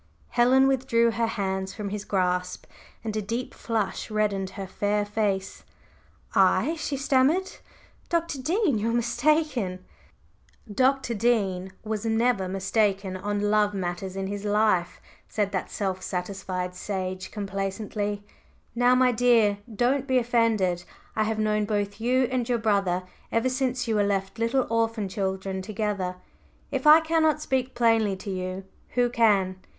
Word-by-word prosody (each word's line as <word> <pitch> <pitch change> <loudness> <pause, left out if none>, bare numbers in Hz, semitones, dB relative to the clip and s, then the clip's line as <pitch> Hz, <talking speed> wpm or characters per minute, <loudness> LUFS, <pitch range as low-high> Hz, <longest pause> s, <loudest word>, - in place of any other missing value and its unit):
Helen 255 +2 +4
withdrew 245 -3 +2
her 230 0 0
hands 190 -3 -3
from 210 -2 -4
his 205 0 -5
grasp 180 -2 -1 0.4
and 220 -1 -3
a 215 - 0
deep 230 +5 -4
flush 225 -2 -2
reddened 205 -3 0
her 195 - -4
fair 205 +2 -1
face. 205 -2 -2 0.7
"I!" 320 - +4
she 295 -3 -3
stammered 285 +7 +2 0.6
"Dr. 335 -5 -1
Dean, 325 - +1
you 220 +2 0
are - - 0
mistaken. 240 - 0 0.4
…" 215 - -18
"Dr. 265 -2 +2
Dean 200 -5 0
was 215 -1 -3
never 225 -3 +1
mistaken 195 0 0
on 205 +2 -1
love 210 -1 +2
matters 185 0 -4
in 195 0 -3
his 200 +1 -4
life," 205 -4 +1 0.3
said 205 -2 -1
that 190 - -3
self 190 -2 -2
satisfied 180 -1 -4
sage 185 -1 -4
complacently. 205 +1 -3 0.5
"Now, 245 +2 +4
my 255 0 +4
dear, 225 -4 +3
don't 255 +5 +1
be 260 -1 +3
offended. 225 -7 +1 0.3
I 215 - +1
have 220 0 -1
known 215 -1 +1
both 205 0 -2
you 255 +3 +3
and 250 -2 -1
your 245 - +2
brother 200 -5 +1 0.3
ever 230 +3 +1
since 255 -1 -1
you 225 - +1
were 205 - +3
left 195 +1 -1
little 240 +3 +1
orphan 225 -2 0
children 190 0 -3
together; 205 -3 -2 0.6
if - - -1
I 310 +2 +9
cannot 320 -1 +2
speak 260 -3 -1
plainly 225 -4 +3
to 195 +1 -6
you, 185 +1 -4 0.3
who 245 0 +4
can? 205 -6 +2
215 Hz, 145 wpm, -26 LUFS, 195-240 Hz, 0.7 s, I